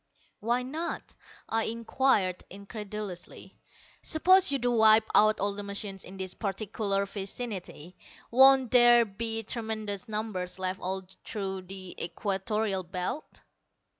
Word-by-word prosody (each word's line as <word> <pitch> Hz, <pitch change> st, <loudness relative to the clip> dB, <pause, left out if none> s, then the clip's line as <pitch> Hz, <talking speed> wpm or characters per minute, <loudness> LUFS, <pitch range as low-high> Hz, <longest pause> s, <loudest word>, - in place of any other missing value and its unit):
"Why 240 Hz, +3 st, 0 dB
not?" 315 Hz, +7 st, -5 dB, 0.3 s
I 225 Hz, 0 st, 0 dB
inquired 225 Hz, -4 st, +1 dB
incredulously. 200 Hz, -2 st, -8 dB, 0.5 s
"Suppose 370 Hz, +2 st, +4 dB
you 280 Hz, -, +2 dB
do 245 Hz, -1 st, 0 dB
wipe 220 Hz, -1 st, +5 dB
out 215 Hz, +1 st, +5 dB
all 200 Hz, +1 st, 0 dB
the 205 Hz, -, -6 dB
machines 200 Hz, -1 st, -5 dB
in 190 Hz, +2 st, -11 dB
this 190 Hz, -1 st, -5 dB
particular 200 Hz, -1 st, -2 dB
vicinity, 195 Hz, -4 st, -5 dB, 0.4 s
won't 265 Hz, 0 st, +6 dB
there 240 Hz, -1 st, +7 dB
be 225 Hz, +2 st, -3 dB
tremendous 220 Hz, -3 st, -3 dB
numbers 210 Hz, -5 st, -3 dB
left 185 Hz, 0 st, -2 dB
all 190 Hz, +1 st, -3 dB, 0.2 s
through 190 Hz, -3 st, -5 dB
the 190 Hz, -1 st, -7 dB
Equatorial 195 Hz, +3 st, -1 dB
Belt?" 180 Hz, -, -5 dB
210 Hz, 120 wpm, -29 LUFS, 190-230 Hz, 0.5 s, there